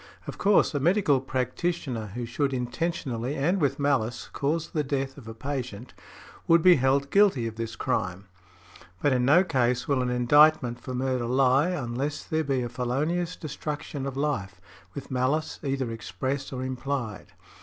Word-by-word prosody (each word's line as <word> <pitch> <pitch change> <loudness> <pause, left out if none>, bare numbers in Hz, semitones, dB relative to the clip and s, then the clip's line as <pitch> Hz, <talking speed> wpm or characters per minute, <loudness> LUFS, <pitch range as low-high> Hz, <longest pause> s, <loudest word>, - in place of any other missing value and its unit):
Of - - -7
course, 200 -4 +4
a 145 - 0
medical 155 -3 +3
practitioner 130 -2 -2
who 120 -1 -3
should 135 +4 -1
intentionally, 125 -1 -2
and 170 +7 +1
with 140 -2 +1
malice, 135 -5 -1
cause 155 +3 -1
the 150 - 0
death 135 -1 -2
of 130 -6 -12
a 115 - -7
patient, 125 -3 -5 0.5
would 165 -1 +5
be 180 -1 +7
held 135 +2 +1
guilty 195 - +4
of 115 -1 -4
this 115 0 -5
crime; 95 +1 -2 0.8
but 145 - +4
in 125 -1 +2
no 160 +7 +6
case 125 -7 0
will 140 -3 +2
an 125 - -1
indictment 125 0 +4
for 130 - -6
murder 130 -1 -1
lie, 130 +5 +3
unless 140 -2 -3
there 160 0 -1
be 135 -3 0
a - - -2
felonious 145 +9 -1
destruction 150 -2 -5
of 135 -1 -5
life, 100 -11 -2 0.4
with 140 - -7
malice 130 +5 0
either 135 -4 -2
express 130 +5 -4
or 130 -1 -4
implied. 130 -4 -4
135 Hz, 165 wpm, -27 LUFS, 125-150 Hz, 0.8 s, be